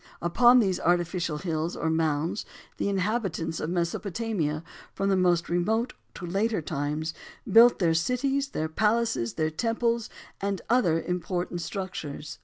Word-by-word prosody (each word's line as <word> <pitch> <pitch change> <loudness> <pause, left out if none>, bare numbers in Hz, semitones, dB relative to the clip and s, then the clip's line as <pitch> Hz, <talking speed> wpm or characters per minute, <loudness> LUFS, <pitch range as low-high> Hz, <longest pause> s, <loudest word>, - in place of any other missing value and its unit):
Upon 240 +9 +5
these 190 -5 +1
artificial 175 -2 0
hills 160 0 -2
or 160 - -1
mounds, 160 +3 0 0.3
the - - 0
inhabitants 190 -5 -1
of 155 - -3
Mesopotamia, 175 -2 -2 0.3
from 195 - 0
the 195 - +3
most 175 -2 +2
remote 220 +8 0 0.2
to 180 - -6
later 205 +5 0
times, 155 +1 -3 0.3
built 235 +2 +7
their 170 -4 +2
cities, 270 +11 0
their 160 - -2
palaces, 210 - 0
their 155 0 0
temples 230 +5 0 0.3
and 200 -1 -1
other 175 -10 +3
important 180 0 -2
structures. 160 -5 -5
175 Hz, 135 wpm, -27 LUFS, 160-220 Hz, 0.3 s, built